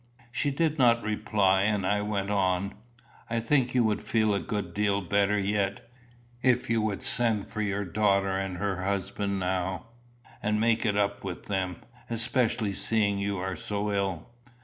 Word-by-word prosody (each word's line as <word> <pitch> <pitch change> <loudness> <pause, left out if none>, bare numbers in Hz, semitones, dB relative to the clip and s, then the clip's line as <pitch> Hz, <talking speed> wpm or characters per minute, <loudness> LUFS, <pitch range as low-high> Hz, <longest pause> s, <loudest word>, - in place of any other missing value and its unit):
She 145 - 0
did 155 +1 0
not 120 -2 +4
reply, 105 -2 +2
and 100 -1 +1
I 105 +2 +1
went 105 -1 -2
on: 95 -1 +1 0.6
"I 115 0 0
think 125 +2 +1
you 125 - +5
would 110 -2 +1
feel 110 -2 +1
a 100 - +1
good 95 -1 -4
deal 100 0 +1
better 100 +2 +2
yet, 100 0 -1 0.5
if 125 -2 +2
you 115 -1 +2
would 105 -2 -2
send 120 -5 +1
for 110 - -3
your 100 -1 -1
daughter 100 0 +2
and 95 -1 -2
her 95 -1 -2
husband 100 +1 -1
now, 95 +3 -2 0.6
and 105 0 +1
make 115 0 +2
it 105 -1 +1
up 100 0 0
with 95 -3 -6
them, 95 -3 -2 0.3
especially 115 -2 0
seeing 100 0 +1
you 100 0 -1
are 95 +1 -3
so 105 +2 -2
ill." 95 -4 -2
100 Hz, 170 wpm, -28 LUFS, 95-110 Hz, 0.6 s, you